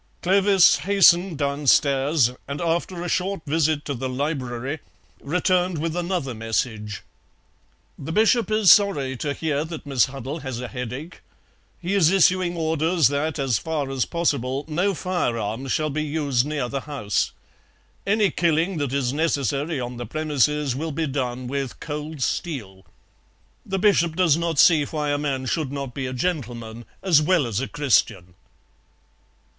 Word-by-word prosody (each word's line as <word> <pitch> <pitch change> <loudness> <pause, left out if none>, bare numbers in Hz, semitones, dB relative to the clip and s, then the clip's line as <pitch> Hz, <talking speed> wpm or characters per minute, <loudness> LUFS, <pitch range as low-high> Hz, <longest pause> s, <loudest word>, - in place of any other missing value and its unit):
Clovis 195 0 +5
hastened 185 -3 +4
downstairs, 140 -1 +2 0.2
and 140 +1 -5
after 170 +1 -1
a - - -3
short 185 +1 -1
visit 155 0 0
to 145 - -2
the 130 0 -4
library 135 0 -3 0.4
returned 180 +3 +1
with 165 +2 -2
another 175 -7 -2
message: 110 -2 -3 1.0
"The 145 - -6
Bishop 220 +3 +3
is 215 -4 +5
sorry 145 -11 +3
to 145 +2 -3
hear 150 -2 -1
that 160 -1 -8
Miss 135 -4 +3
Huddle 135 +3 -6
has 130 -4 -5
a 125 - -5
headache. 125 +6 -7 0.6
He 180 +3 -3
is 185 -6 +4
issuing 185 -1 +3
orders 160 -2 +2
that 145 +2 -1
as 135 -6 0
far 150 -4 -3
as 130 -2 0
possible 140 -5 -1
no 180 +5 0
firearms 125 - -2
shall 155 -1 0
be 155 +2 -2
used 145 -4 0
near 150 -4 -2
the 135 +2 -4
house; 120 -10 -2 0.7
any 205 -1 +2
killing 170 +2 +1
that 140 -3 -2
is 135 -2 0
necessary 145 -1 -1
on 125 0 -5
the 120 -2 -6
premises 150 -1 0
will 160 +4 -3
be 160 +2 -2
done 130 -3 -3
with 135 0 -4
cold 150 -1 -5
steel. 105 - -4 0.8
The 195 - -3
Bishop 180 -5 +2
does 175 -4 +4
not 165 -1 -2
see 155 0 +6
why 150 0 -3
a 145 - 0
man 135 -3 -2
should 150 0 -2
not 140 -3 -5
be 130 0 -4
a - - -4
gentleman 120 -7 -4 0.2
as 165 -6 +5
well 165 -2 +2
as 115 -3 -2
a 135 - -2
Christian." 100 -10 0
150 Hz, 155 wpm, -23 LUFS, 130-170 Hz, 1.0 s, see